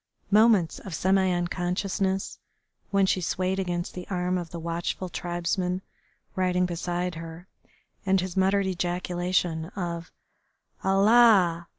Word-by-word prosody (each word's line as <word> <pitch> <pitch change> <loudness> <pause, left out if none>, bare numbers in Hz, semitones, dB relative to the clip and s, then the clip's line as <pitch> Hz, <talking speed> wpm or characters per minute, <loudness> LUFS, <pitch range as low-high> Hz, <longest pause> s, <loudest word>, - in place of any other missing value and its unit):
Moments 210 -5 +4
of 190 -5 -7
semi 190 +1 +2
unconsciousness, 185 +2 -1 0.5
when 200 -1 +3
she 190 -1 +1
swayed 185 +2 -1
against 175 -2 -2
the 180 -1 -7
arm 180 -1 -1
of 175 -2 -3
the 170 - -7
watchful 170 +2 -3
tribesman 180 +2 -2 0.5
riding 180 -1 +1
beside 175 +1 -2
her, 165 +2 -9 0.6
and 190 0 +2
his 185 -1 -4
muttered 195 +1 +2
ejaculation 180 -2 -1
of 170 -3 -4 0.7
"Allah! 195 -4 +5
180 Hz, 115 wpm, -26 LUFS, 175-190 Hz, 0.7 s, Allah